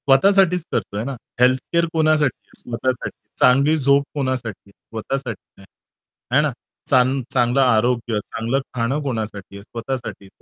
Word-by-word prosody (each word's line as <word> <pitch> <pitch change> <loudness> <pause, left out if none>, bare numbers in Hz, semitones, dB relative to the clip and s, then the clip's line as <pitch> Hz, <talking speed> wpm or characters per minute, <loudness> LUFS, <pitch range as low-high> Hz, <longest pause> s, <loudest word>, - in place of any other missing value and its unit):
स्वतःसाठीच 180 +4 +5
करतोय 105 +2 -2
ना. 135 +2 -4 0.2
हेल्थ 130 +1 +5
केअर 170 0 +4
कोणासाठी 155 -4 +2
आहे? - - -21
स्वतःसाठी. 125 +1 -3 0.2
चांगली 140 +5 +5
झोप 140 0 +4
कोणासाठी? 130 -8 -3
स्वतःसाठी 115 0 -6
आहे. - - -15 0.7
आहे 140 +4 +5
ना? 150 -1 +1 0.4
चांग 130 0 +3
चांगलं 125 +1 +3
आरोग्य, 120 -2 +2
चांगलं 115 +4 -1 0.2
खाणं 125 +5 0
कोणासाठी 110 -7 -4
आहे? 100 - -9
स्वतःसाठी. 115 -2 -6
130 Hz, 135 wpm, -21 LUFS, 115-140 Hz, 0.7 s, स्वतःसाठीच